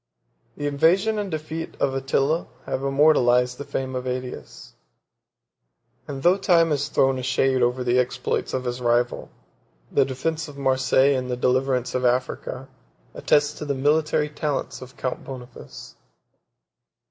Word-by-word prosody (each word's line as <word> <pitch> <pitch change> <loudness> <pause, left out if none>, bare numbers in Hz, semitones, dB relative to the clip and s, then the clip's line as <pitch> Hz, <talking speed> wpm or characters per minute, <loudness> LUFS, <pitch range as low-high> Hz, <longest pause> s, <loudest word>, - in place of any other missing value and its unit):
The 145 - -4
invasion 180 +10 +2
and 205 -1 -3
defeat 160 0 -5
of 135 - +1
Attila 135 +4 0 0.2
have - - -3
immortalized 125 -3 +3
the - - -4
fame 130 -2 -4
of 125 0 -4
Ætius; 125 0 -6 1.4
and 135 -2 -6
though 180 +2 +5
time 170 -4 +3
has 145 -1 0
thrown 135 -2 +2
a - - -4
shade 130 0 +1
over 125 +1 +1
the 125 0 +2
exploits 125 0 -1
of 130 - -2
his 125 0 -4
rival, 120 0 0 0.6
the - - +4
defence 155 +5 -3
of 145 -1 -11
Marseilles, 135 0 +3
and 125 0 -4
the 125 - -2
deliverance 125 0 +1
of 130 - -1
Africa, 125 +1 -1 0.5
attest 150 0 +1
the 145 -2 -2
military 150 +2 +1
talents 150 -2 -3
of 130 0 -12
Count 130 -2 -3
Boniface. 125 - -10
135 Hz, 145 wpm, -24 LUFS, 125-150 Hz, 1.4 s, though